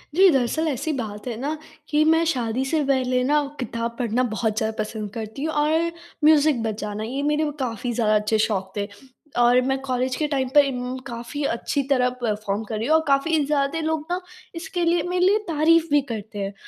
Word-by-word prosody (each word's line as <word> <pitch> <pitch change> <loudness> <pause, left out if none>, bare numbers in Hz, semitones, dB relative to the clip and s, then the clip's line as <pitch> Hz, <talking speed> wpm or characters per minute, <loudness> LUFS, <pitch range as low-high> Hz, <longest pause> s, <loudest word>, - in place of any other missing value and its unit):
जी, 380 +2 +7
दरअसल 290 +2 +1
ऐसी 300 +2 -1
बात 215 -4 -5
है 240 - -3
ना 295 +4 -2 0.3
कि 300 +1 +3
मैं 325 +1 +3
शादी 245 0 -1
से 305 +2 +1
पहले 255 -2 +1
ना 295 +3 +2 0.2
किताब 235 -1 -3
पढ़ना 245 0 +1
बहुत 220 -1 -1
ज़्यादा 220 -1 -1
पसंद 215 -1 -6
करती 220 +4 -6
हूँ 315 0 -1
और 320 +3 +1 0.3
म्यूज़िक 300 -4 +5
बजाना, 210 -1 -3
ये 260 +5 -3
मेरे 300 +1 +1
काफ़ी 245 -2 -2
ज़्यादा 220 -2 +2
अच्छे 210 +1 +2
शौक 190 -2 -3
थे। 200 0 -1 0.5
और 245 +1 +5
मैं 265 +1 0
कॉलेज 255 0 -1
के 305 +3 -1
टाइम 270 -3 -1
पे 290 - +10
इम 250 -1 -3
काफ़ी 240 +4 -5
अच्छी 260 +4 -1
तरह 255 -3 +3
परफॉर्म 210 -2 -1
कर 220 0 -4
रही 225 +3 -2
हूँ 315 - +4
और 320 - +3
काफ़ी 285 +4 +2
ज़्यादा 285 +2 0
लोग 315 -1 -1
ना 355 - 0 0.4
इसके 345 +1 -3
लिए 340 0 +3
मेरे 360 0 +1
लिए 400 +3 +5
तारीफ़ 330 +1 +3
भी 290 0 +5
करते 215 -1 -6
हैं। 195 0 -3
255 Hz, 200 wpm, -23 LUFS, 225-300 Hz, 0.5 s, पे